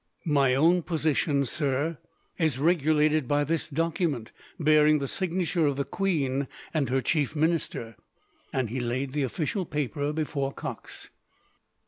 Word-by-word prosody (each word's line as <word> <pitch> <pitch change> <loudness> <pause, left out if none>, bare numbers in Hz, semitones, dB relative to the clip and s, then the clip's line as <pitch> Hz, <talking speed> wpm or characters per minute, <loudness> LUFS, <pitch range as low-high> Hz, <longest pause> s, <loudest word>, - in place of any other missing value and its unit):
"My 140 -5 +3
own 170 +6 +4
position, 155 -3 +1
sir, 145 +3 -1 0.4
is 155 -6 +2
regulated 155 -2 +2
by 145 +2 +2
this 160 +2 -1
document, 155 -5 -1 0.3
bearing 155 -1 +5
the 140 -2 -3
signature 175 -1 0
of 140 -1 0
the 140 - -1
queen 140 -8 0 0.3
and 145 -6 0
her 130 +1 +1
chief 150 -1 0
minister;" 155 -8 -1 0.6
and 130 -5 -1
he 130 - -2
laid 130 +2 -2
the 150 - 0
official 155 - -1
paper 150 -2 -2
before 145 -3 -2
Cox. - - -8
150 Hz, 135 wpm, -27 LUFS, 135-160 Hz, 0.6 s, bearing